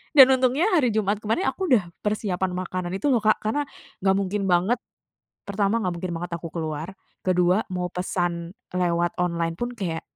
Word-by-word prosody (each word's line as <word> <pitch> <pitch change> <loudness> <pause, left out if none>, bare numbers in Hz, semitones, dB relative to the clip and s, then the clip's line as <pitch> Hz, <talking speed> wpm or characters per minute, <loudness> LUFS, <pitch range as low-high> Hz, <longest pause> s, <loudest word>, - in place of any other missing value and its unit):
Dan 265 -2 +9
untungnya 260 +5 +2
hari 285 -8 +4
Jumat 210 -1 +1
kemarin, 225 - 0
aku 375 -2 -3
udah 190 -7 +3 0.2
persiapan 190 -3 0
makanan 185 -1 -3
itu 195 +9 0
loh 240 - +4
Kak, 215 +1 +4
karena 285 +7 0 0.4
gak 190 0 +3
mungkin 200 +1 -1
banget 180 +7 +3 0.7
pertama, 200 +2 +1
gak 180 - 0
mungkin 175 0 -4
banget 175 +1 -5
aku 165 - -6
keluar, 160 +2 -4 0.3
kedua 180 +1 +3
mau 180 -1 -2
pesan 175 -2 -2 0.2
lewat 175 -1 +1
online 170 -1 0
pun 240 +6 -2
kayak, 170 -6 -3
185 Hz, 170 wpm, -25 LUFS, 175-215 Hz, 0.7 s, Dan